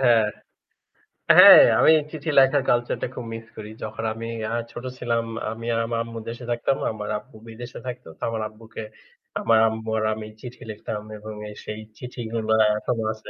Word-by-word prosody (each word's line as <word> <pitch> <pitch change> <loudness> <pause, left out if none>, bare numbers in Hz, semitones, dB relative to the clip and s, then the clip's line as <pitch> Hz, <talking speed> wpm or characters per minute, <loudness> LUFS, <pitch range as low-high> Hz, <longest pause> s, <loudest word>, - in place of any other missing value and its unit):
হ্যাঁ। 120 -4 +5 1.1
হ্যাঁ - - +11 0.2
আমি - - +7 0.2
চিঠি 155 0 -5
লেখার 135 +1 +4
কালচারটা 120 +1 +1
খুব 125 - -6
মিস 115 0 -7
করি। 105 -1 -8
যখন 110 +1 -5
আমি 115 +1 -6 0.2
আ - - -2 0.2
ছোট 120 - -8
ছিলাম, 115 -1 0 0.3
আমি 115 +1 -7
আর 115 - +1
আমার 115 0 -2
আম্মু 115 0 -7
দেশে 120 +2 -7
থাকতাম। 120 +3 0
আমার 105 -1 -6
আব্বু 115 +1 -21
বিদেশে 120 +2 -8
থাকত। 125 0 -6
তো - - -39
আমার 110 -1 -3
আব্বুকে 110 +1 -10 0.6
আমার 115 -1 +4
আম্মু 110 0 -4
আর 110 - -1
আমি 110 0 -7
চিঠি 125 -1 -10
লিখতাম 105 0 -5 0.2
এবং 110 +1 -8 0.2
এ - - -8
সেই 110 0 -5 0.2
চিঠিগুলা 115 -3 -2 0.2
এখনো 115 +1 -2
আছে। 110 - -13
115 Hz, 175 wpm, -24 LUFS, 110-120 Hz, 1.1 s, হ্যাঁ